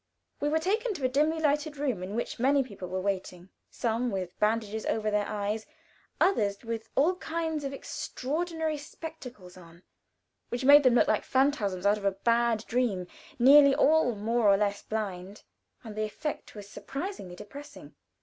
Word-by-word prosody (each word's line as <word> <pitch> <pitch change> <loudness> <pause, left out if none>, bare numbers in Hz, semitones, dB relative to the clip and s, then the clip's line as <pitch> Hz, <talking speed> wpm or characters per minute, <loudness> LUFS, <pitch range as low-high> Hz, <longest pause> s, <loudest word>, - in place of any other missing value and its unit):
We 290 - 0
were 310 - +2
taken 420 +7 0
to 275 - -3
a - - +5
dimly 305 +5 +1
lighted 300 0 0
room 260 -9 -1
in 190 +3 -5
which 235 - -3
many 275 +3 +3
people 200 -7 -9
were 185 +1 -3
waiting, 185 -2 -4 0.2
some 235 +1 -1
with 185 -4 -5
bandages 220 0 0
over 215 -1 0
their 210 -1 0
eyes, 210 +1 -3 0.5
others 205 - +1
with 225 -1 -5
all 345 +7 +3
kinds 320 -3 -3
of 275 - -3
extraordinary 315 +4 -3
spectacles 255 - -10
on, 170 0 -16 0.7
which 245 +2 -3
made 290 +2 +9
them 255 -3 +4
look - - +4
like 215 - +1
phantoms 230 -9 +1
out 205 +1 +3
of 200 - -8
a 195 - +2
bad 230 +2 +1
dream 230 -7 0 0.3
nearly 275 +2 +7
all 300 -6 +3
more 225 +2 +1
or 195 - +5
less 205 0 -1
blind, 200 -2 -5 0.4
and 220 -3 -9
the 215 - -1
effect 285 +7 -6
was 205 -1 -9
surprisingly 275 - -6
depressing. 275 +10 -11
235 Hz, 170 wpm, -28 LUFS, 205-290 Hz, 0.7 s, made